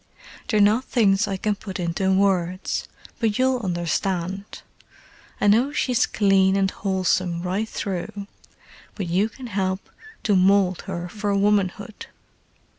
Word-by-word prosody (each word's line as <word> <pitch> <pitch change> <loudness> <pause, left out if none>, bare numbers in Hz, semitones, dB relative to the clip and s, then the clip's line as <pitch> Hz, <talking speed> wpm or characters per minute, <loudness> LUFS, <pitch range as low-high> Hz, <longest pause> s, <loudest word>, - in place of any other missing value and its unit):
They're 215 - +1
not 215 +5 +4
things 205 -3 +2
I 195 -1 -2
can 210 +2 0
put 195 -2 -7
into 180 +2 0
words—but 190 +3 -1
you'll 260 0 +2
understand. 185 0 -3 0.8
I - - 0
know 230 +7 +4
she's 250 -4 +1
clean 195 -2 +3
and 195 -1 +1
wholesome 185 -3 -1
right 195 +5 -2
through, 200 +1 -4 0.7
but 200 - -3
you 185 +6 +1
can 260 +2 -11
help 190 -3 -3 0.3
to 205 - +2
mould 185 -1 +3
her 175 -2 -4
for 205 +1 -2
womanhood. 200 0 0
195 Hz, 125 wpm, -23 LUFS, 185-210 Hz, 0.8 s, not